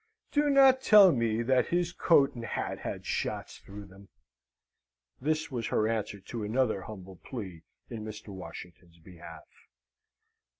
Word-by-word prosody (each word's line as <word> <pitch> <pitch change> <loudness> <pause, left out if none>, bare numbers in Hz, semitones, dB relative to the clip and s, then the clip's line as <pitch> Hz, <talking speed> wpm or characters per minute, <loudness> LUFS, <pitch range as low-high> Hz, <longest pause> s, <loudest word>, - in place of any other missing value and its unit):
Do 295 0 +2
not 270 -2 +6
tell 205 -6 +7
me 115 -3 0
that 130 +1 +2
his 175 0 -1
coat 140 -5 +3
and 120 - -8
hat 115 - -4
had - - -6
shots - - -4
through 100 +1 -11
them! 95 +1 -17 1.1
(This 155 +2 -1
was 120 -3 -3
her 110 - +1
answer 110 -2 -3
to 110 +3 -7
another 110 -1 0
humble 95 -3 -10
plea 95 -7 -8 0.3
in 110 -2 -7
Mr. 105 0 -9
Washington's 90 -2 -11
behalf.) 85 -1 -13
110 Hz, 140 wpm, -29 LUFS, 95-135 Hz, 1.1 s, tell